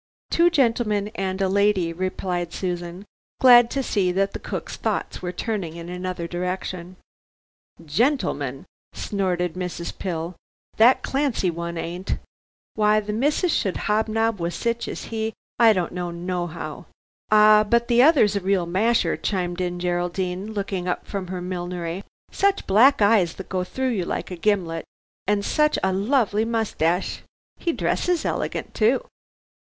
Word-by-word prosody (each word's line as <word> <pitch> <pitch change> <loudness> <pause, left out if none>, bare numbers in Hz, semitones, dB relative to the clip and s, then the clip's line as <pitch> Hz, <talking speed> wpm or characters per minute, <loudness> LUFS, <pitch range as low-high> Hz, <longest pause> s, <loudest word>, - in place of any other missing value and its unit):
"Two 340 +1 +5
gentlemen 230 -9 +1
and 195 -3 -3
a - - +2
lady," 195 -3 +2
replied 180 -1 -3
Susan, 175 +1 -4 0.3
glad 240 -2 +8
to 270 +1 -1
see 195 -7 +1
that 195 +2 0
the - - -5
cooks - - -5
thoughts - - -3
were 180 - -3
turning 190 -6 -3
in 170 0 -8
another 180 -1 -4
direction. 180 0 -4 0.9
"Gentlemen!" 150 - 0 0.3
snorted 180 -4 -1
Mrs. 180 -2 -5
Pill, 170 -1 -4 0.4
"that 235 +4 +5
Clancy 265 -10 0
one 170 0 -5
ain't. 175 +3 -3 0.6
Why 215 0 +3
the 210 0 -4
missus 295 - +1
should 195 -5 0
hobnob 220 0 0
with 170 +1 -2
sich 235 0 -2
as - - -5
he, 220 0 -2 0.3
I 230 -2 +7
don't 185 -5 -1
know 175 -1 -3
nohow." 170 -3 -5 0.4
"Ah, 215 0 +7
but 235 +2 +2
the 240 0 +5
other's 260 -8 +5
a - - +2
real 190 -2 +1
masher," 215 +7 +2
chimed 180 -2 -2
in 175 -1 -2
Geraldine, 180 +3 -2
looking 195 -3 -3
up 180 - -2
from 195 -3 -4
her 180 0 -5
millinery; 175 0 -4 0.3
"such 395 0 +1
black 220 +4 +5
eyes, 200 -5 +3
that 190 - -9
go 185 -1 -1
through 260 +8 -2
you 190 -7 -1
like - - -4
a - - -3
gimlet, 175 -3 0 0.4
and 205 0 +1
such 300 0 +2
a 190 0 +2
lovely 215 +1 +1
moustache. 210 -6 0 0.4
He 340 - 0
dresses 355 +1 0
elegant - - -3
too." 230 +4 +2
190 Hz, 150 wpm, -23 LUFS, 175-220 Hz, 0.9 s, glad